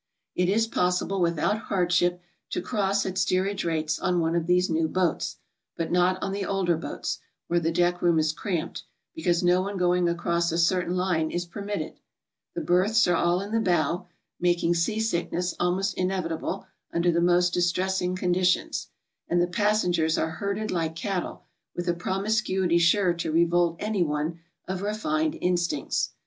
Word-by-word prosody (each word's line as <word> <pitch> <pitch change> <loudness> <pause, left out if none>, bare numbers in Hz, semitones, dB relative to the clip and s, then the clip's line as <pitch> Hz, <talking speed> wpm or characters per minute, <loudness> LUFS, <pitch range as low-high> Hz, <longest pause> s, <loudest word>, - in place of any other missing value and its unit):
It 180 0 +1
is 220 +3 +3
possible 180 -2 0
without 170 +5 +1
hardship 180 -1 +2 0.3
to - - -2
cross 200 0 0
at 185 0 -3
stee^ 185 0 +2
age 200 -1 -2
rates 160 -2 -1
on 180 -1 +1
one 165 0 0
of 170 -1 0
these 180 +1 +3
new 160 -1 +1
boats, 180 0 -1 0.4
but 165 - -2
not 180 +1 +3
on - - -2
the 200 0 -2
older 190 -3 +1
boats, 160 - -4 0.3
where 175 0 +2
the 165 0 0
deck 175 +1 +1
room 170 -2 +3
is 155 0 +2
cramped, 175 -2 -3 0.3
be - - -8
cause 175 +1 +1
no 185 +3 +2
going 180 -1 +2
across 170 0 0
a 165 - -1
certain 180 +1 +2
line 175 -4 +1
is 175 +1 -2
permitted; 200 -3 -5 0.6
the - - -2
berths 195 +5 +3
are 175 - +3
all 175 +2 +2
in 200 +1 -6
the 225 - +2
bow, 175 -2 0 0.3
making 175 -1 +2
sea 175 +6 0
sickness 180 -4 -1
almost 185 +3 +1
inevitable 185 0 -2 0.3
under 170 +1 +2
the 170 0 +1
most 175 0 +3
distressing 180 +1 0
condition 180 0 +1
s; - - -4 0.4
and 175 - +2
the 175 - +4
passengers 180 -4 +1
are 160 - 0
herded 200 +5 -3
like 165 -3 -1
cattle 185 +2 -3 0.3
with 175 +1 -4
a 175 - +3
promiscuity 190 -1 0
sure 175 +2 +4
to 170 -2 -3
revolt 170 +1 +3
any 210 -1 -1
one 155 +2 -2 0.3
of 190 0 -3
refined 310 +10 -1
instincts. 175 -5 0
180 Hz, 170 wpm, -26 LUFS, 170-190 Hz, 0.6 s, the